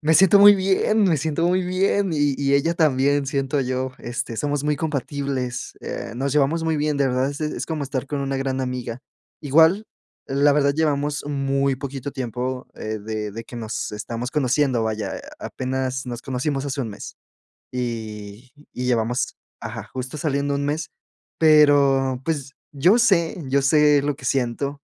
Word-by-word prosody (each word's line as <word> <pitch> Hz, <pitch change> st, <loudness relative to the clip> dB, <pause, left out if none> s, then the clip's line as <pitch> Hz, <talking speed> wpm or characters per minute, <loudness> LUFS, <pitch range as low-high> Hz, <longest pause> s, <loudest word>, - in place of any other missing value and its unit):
me 160 Hz, +1 st, +2 dB
siento 195 Hz, +3 st, +7 dB
muy 205 Hz, +1 st, +9 dB
bien, 195 Hz, +3 st, +2 dB
me 175 Hz, -5 st, +3 dB
siento 160 Hz, +3 st, 0 dB
muy 185 Hz, +1 st, +2 dB
bien, 190 Hz, +1 st, +1 dB
y 145 Hz, -2 st, +1 dB
y 140 Hz, 0 st, +2 dB
ella 165 Hz, +5 st, +2 dB
también 145 Hz, -2 st, +2 dB
siento 140 Hz, 0 st, 0 dB
yo, 130 Hz, 0 st, -2 dB
este, 120 Hz, -1 st, -4 dB
somos 145 Hz, +2 st, -1 dB
muy 150 Hz, 0 st, 0 dB
compatibles, 140 Hz, -4 st, -3 dB
eh, -, -, -6 dB
nos 135 Hz, +3 st, -2 dB
llevamos 150 Hz, +3 st, +2 dB
muy 160 Hz, -1 st, 0 dB
bien, 150 Hz, 0 st, 0 dB
de 140 Hz, -1 st, +2 dB
verdad, 130 Hz, +1 st, +1 dB
es 145 Hz, +2 st, -8 dB
es 150 Hz, 0 st, -3 dB
como 160 Hz, -3 st, -3 dB
estar 135 Hz, -1 st, -3 dB
con 145 Hz, 0 st, -3 dB
una 135 Hz, 0 st, -2 dB
gran 135 Hz, 0 st, -2 dB
amiga, 125 Hz, -2 st, -4 dB, 0.4 s
igual, 160 Hz, +8 st, +4 dB, 0.4 s
la 140 Hz, +2 st, +3 dB
verdad 140 Hz, -1 st, +3 dB
llevamos 145 Hz, -1 st, 0 dB
muy 140 Hz, -1 st, 0 dB
poquito 135 Hz, 0 st, -6 dB
tiempo, 125 Hz, +1 st, -4 dB
eh, 110 Hz, 0 st, -5 dB
de 105 Hz, 0 st, -4 dB
de 115 Hz, +3 st, -6 dB
que 120 Hz, -, -11 dB
nos 110 Hz, -1 st, -4 dB
estamos 115 Hz, +4 st, -5 dB
conociendo, 130 Hz, -4 st, +1 dB
vaya, 110 Hz, -3 st, -3 dB, 0.2 s
apenas 130 Hz, 0 st, -3 dB
nos 120 Hz, -1 st, -6 dB
conocimos 135 Hz, +2 st, -2 dB
hace 140 Hz, 0 st, -3 dB
1 115 Hz, -5 st, -3 dB
mes, 100 Hz, -, -9 dB, 0.6 s
y 110 Hz, -1 st, -5 dB, 0.2 s
y 125 Hz, -, -4 dB
llevamos, 120 Hz, 0 st, 0 dB, 0.2 s
ajá, -, -, -7 dB
justo 130 Hz, +2 st, -5 dB
saliendo 140 Hz, -1 st, -1 dB
un 140 Hz, -, -1 dB
mes, 150 Hz, +1 st, -2 dB, 0.5 s
pero 140 Hz, -4 st, +4 dB
pues, 140 Hz, -4 st, -3 dB, 0.2 s
yo 175 Hz, -, +4 dB
sé 170 Hz, -7 st, +3 dB
yo 140 Hz, +1 st, +3 dB
sé 150 Hz, 0 st, +4 dB
lo 145 Hz, 0 st, -1 dB
que 140 Hz, -, -16 dB
siento, 135 Hz, +2 st, -1 dB
140 Hz, 170 wpm, -22 LUFS, 125-150 Hz, 0.6 s, muy